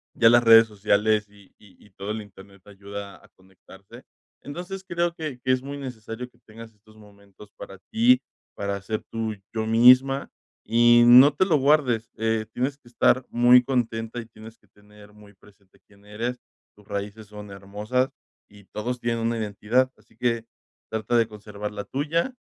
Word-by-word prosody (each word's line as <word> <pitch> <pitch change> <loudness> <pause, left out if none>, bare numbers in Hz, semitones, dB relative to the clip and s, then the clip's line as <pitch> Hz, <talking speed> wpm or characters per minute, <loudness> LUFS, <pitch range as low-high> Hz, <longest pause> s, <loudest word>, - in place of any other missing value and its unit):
ya 115 - +5
las 120 +1 +5
redes 115 -1 +7
sociales 105 0 +1
y 100 -1 -20
y 95 -4 -21
y - - -20
todo 100 +2 -6
el 110 0 -4
internet 100 -1 -17
ayuda 100 0 -10
a - - -19
conectarse. 95 0 -17 0.4
Entonces, 180 +6 -7
creo 175 -1 -1
que 155 -6 -6
que 130 - 0
es 130 0 +1
muy 140 +1 -7
necesario 125 -2 -8
que 120 - -31
tengas 115 +1 -12
estos 110 +1 -23
momentos 100 -1 -18
para 95 - -11
ti, 240 +3 +4 0.3
para 100 0 -3
ser 110 +2 -4
tú, 110 -1 -3 0.2
yo 110 -1 -2
misma 130 +4 +5 0.4
y 120 +1 +5
no 130 +4 +8
te 170 +6 +1
lo 165 -5 +2
guardes. 135 -5 +1
Eh, 110 0 -1
tienes 135 +3 -2
que 145 - -25
estar 125 +2 +2
muy 120 +1 +5
contenta 120 -2 -2
y 115 - -13
tienes 110 0 -14
que - - -31
tener 105 0 -19
muy 105 -1 -18
presente 100 -1 -24
quién 100 0 -23
eres. 115 +4 -4 0.4
Tus 105 -1 -21
raíces 100 +2 -6
son 105 0 -11
hermosas 105 +7 -3 0.4
y 100 -1 -18
todos 120 +5 -5
tienen 115 0 -1
una 115 0 -1
identidad, 110 +5 0
así - - -27
que 115 -1 -1 0.5
trata 110 +2 -1
de 115 -1 +2
conservar 105 -1 -8
la 100 -1 -6
tuya 155 - -1
115 Hz, 175 wpm, -24 LUFS, 105-125 Hz, 0.5 s, no